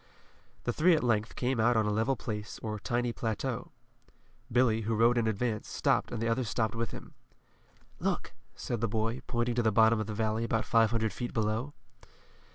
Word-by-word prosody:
The 120 - -1
three 170 +5 +5
at 155 - -1
length 115 -2 0
came 125 -1 0
out 120 +1 +4
on 110 - +3
a 105 - +1
level 110 +6 +1
place 105 -2 -5
or 105 -1 -3
tiny 120 +2 -1
plateau. 125 +8 -3 0.8
Billy, 115 -2 +3
who 110 +1 -1
rode 115 +2 +4
in 115 -2 +1
advance, 110 0 -1
stopped - - +1
and 120 - -3
the 115 - -1
others 115 0 0
stopped 110 -2 0
with 115 0 -2
him. - - -10 0.9
"Look," - - -2 0.2
said 120 -3 -4
the 115 - +2
boy, 115 +3 -1
pointing 120 0 0
to 120 - +1
the 110 -1 +2
bottom 110 +2 +5
of 110 - -2
the 105 - -4
valley, 110 +1 0
about 110 -1 0
five 115 -1 +4
hundred 110 -2 0
feet 120 - -4
below. 110 +6 -1
115 Hz, 195 wpm, -30 LUFS, 110-120 Hz, 0.9 s, three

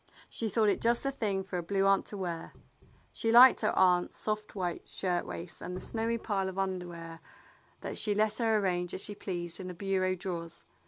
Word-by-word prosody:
She 225 - -2
thought 215 +1 +3
it - - 0
just 235 +1 +3
the 275 - 0
thing 205 -7 -1
for 185 -2 -4
a - - -2
Blue 195 +3 0
Aunt 195 0 +3
to 205 - -7
wear. 175 -3 -4 0.6
She 225 - 0
liked 245 +2 +8
her 215 - +2
aunt's 180 -1 +3
soft 215 0 -3
white 180 -3 -3
shirt 180 -2 -1
waists 170 +1 -6
and 180 - -5
the - - -5
snowy 230 +1 -2
pile 195 -4 -1
of 190 - -8
underwear 175 -3 -4 0.6
that - - -4
she 210 -2 0
let 215 +1 +1
her 225 -2 +3
arrange 180 -3 0
as - - -3
she 205 - -2
pleased 175 -4 -3
in 185 - -6
the 180 - -6
bureau 185 0 0
drawers. 170 -2 -6
190 Hz, 210 wpm, -31 LUFS, 180-215 Hz, 0.6 s, liked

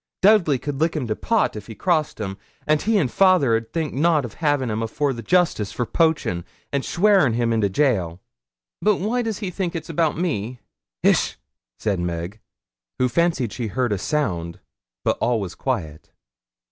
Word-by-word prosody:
Dudley 190 -9 +5
could 140 +2 -5
lick 165 +1 +2
him 145 -5 -1
to 110 -2 -2
pot 225 - +1
if 105 -1 -8
he 110 - -8
crossed 160 - 0
him, 95 -2 -4 0.3
and 155 0 +2
he 220 0 +2
and 160 -9 +2
fayther 180 -7 +4
'ud 115 0 -3
think 160 -3 -2
nout 155 0 +2
o' - - -5
havin' 145 -1 0
him 110 +1 -2
afore 135 +5 -1
the 120 - -6
justices 155 - +1
for 120 - -2
poachin', 115 - +1 0.3
and 140 -1 0
swearin' 190 - +3
him 115 0 +1
into 110 -3 +2
gaol.' 95 - +1 0.6
'But 210 0 +3
why 220 +7 -1
does 225 -4 -2
he 180 - -3
think 180 -1 -3
it's 160 -1 -5
about 160 -2 +1
me?' 125 - -2 0.4
'Hish!' - - +3 0.4
said 100 -4 -1
Meg, 85 +4 -4 0.6
who 125 - +2
fancied 140 -4 0
she 120 -3 -3
heard 120 +2 0
a 100 - -2
sound, 90 - -2 0.5
but - - +1
all 120 -1 +2
was 95 -4 -5
quiet. 85 - -4
130 Hz, 185 wpm, -22 LUFS, 110-165 Hz, 0.6 s, Dudley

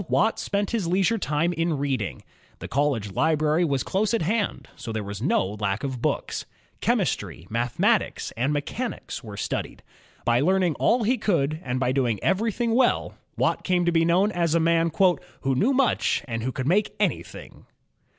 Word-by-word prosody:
Watt 220 +2 +2
spent 200 0 -1
his 220 -7 -1
leisure 195 +6 +2
time 165 +1 0
in 165 -2 0
reading. 135 -7 -2 0.3
The - - -7
college 135 -8 0
library 155 - +2
was 140 -6 0
close 205 +3 0
at 225 - 0
hand, 205 +5 -1
so 115 - -7
there 110 -1 -3
was 100 +1 -6
no - - +2
lack 100 +1 -1
of 130 -3 -3
books. - - -2 0.3
Chemistry, 80 - -1
mathematics, 120 +1 0
and 125 +6 0
mechanics 150 - -4
were 105 -3 -8
studied. - - -4 0.4
By 120 0 +3
learning 180 +3 +2
all 235 0 +3
he 245 +3 +1
could 155 -7 0
and 130 -5 -2
by 125 -1 +1
doing 125 -6 0
everything 225 +5 +1
well. 250 +1 +2 0.2
Watt - - +1
came 180 -1 +1
to 175 - +3
be 165 -1 +3
known 180 +5 +3
as 170 -3 +1
a - - +4
man 165 0 +3 0.5
"who 135 -1 +1
knew 210 - +2
much 270 - +2
and 115 -2 -3
who 130 +3 -2
could 130 - -4
make 200 +6 +2
anything." - - -3
160 Hz, 175 wpm, -25 LUFS, 130-195 Hz, 0.5 s, a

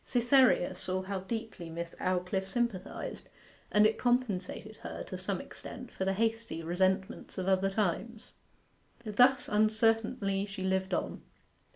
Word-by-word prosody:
Cytherea 245 -6 +4
saw 185 +1 -2
how 195 0 -3
deeply 200 -3 -5
Miss 170 +1 -5
Aldclyffe 185 +1 0
sympathized 215 -3 -3 0.4
and 210 0 +6
it 215 - +2
compensated 215 -4 -1
her, - - -6
to - - -7
some 185 0 -2
extent, 250 +5 -9
for 190 - -3
the 195 - +2
hasty 225 -5 -1
resentments 190 +3 0
of 185 0 -2
other 195 0 +3
times. 215 +3 -2 0.7
Thus 250 +5 +4
uncertainly 215 -1 +2
she 195 -1 -6
lived 190 0 +1
on. - - -3
195 Hz, 135 wpm, -31 LUFS, 185-225 Hz, 0.7 s, and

